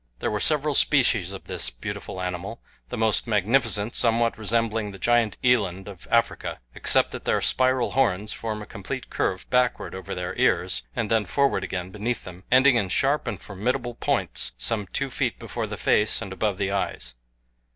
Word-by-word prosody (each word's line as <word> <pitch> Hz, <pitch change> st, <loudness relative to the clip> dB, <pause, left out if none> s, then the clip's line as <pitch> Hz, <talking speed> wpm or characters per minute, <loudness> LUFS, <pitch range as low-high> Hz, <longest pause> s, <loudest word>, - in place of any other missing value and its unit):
There -, -, -2 dB
were 105 Hz, -, -1 dB
several 150 Hz, +4 st, +1 dB
species 120 Hz, -, +3 dB
of 95 Hz, -, -8 dB
this -, -, 0 dB
beautiful 95 Hz, -, -6 dB
animal, 90 Hz, +5 st, -4 dB, 0.3 s
the 125 Hz, -, -4 dB
most 110 Hz, +1 st, +1 dB
magnificent 110 Hz, 0 st, +2 dB
somewhat 115 Hz, -1 st, +3 dB
resembling 110 Hz, 0 st, 0 dB
the 100 Hz, -, -9 dB
giant 120 Hz, 0 st, +2 dB
eland 100 Hz, -7 st, +2 dB
of 95 Hz, -4 st, -10 dB
Africa, 115 Hz, 0 st, +1 dB
except -, -, +2 dB
that -, -, -7 dB
their -, -, +2 dB
spiral 130 Hz, -1 st, +2 dB
horns 105 Hz, -6 st, +1 dB
form 110 Hz, -2 st, -4 dB
a -, -, -9 dB
complete -, -, -6 dB
curve 95 Hz, -, -1 dB
backward 125 Hz, -1 st, +1 dB
over 95 Hz, -, -6 dB
their 90 Hz, +1 st, -4 dB
ears -, -, +2 dB
and 110 Hz, -, -2 dB
then 110 Hz, -2 st, +3 dB
forward 135 Hz, -1 st, +1 dB
again 90 Hz, -1 st, -4 dB
beneath 110 Hz, +3 st, -3 dB
them, 90 Hz, 0 st, -11 dB
ending 130 Hz, 0 st, +6 dB
in 100 Hz, -5 st, 0 dB
sharp 85 Hz, -, +1 dB
and -, -, -3 dB
formidable 120 Hz, +5 st, -2 dB
points 115 Hz, -, -1 dB
some 105 Hz, -, -2 dB
two 140 Hz, +7 st, -2 dB
feet -, -, -1 dB
before -, -, -4 dB
the -, -, -6 dB
face 105 Hz, 0 st, +2 dB
and 95 Hz, -, -6 dB
above 100 Hz, -1 st, -1 dB
the 100 Hz, -1 st, -1 dB
eyes. 100 Hz, -9 st, -2 dB
110 Hz, 180 wpm, -25 LUFS, 95-120 Hz, 0.3 s, ending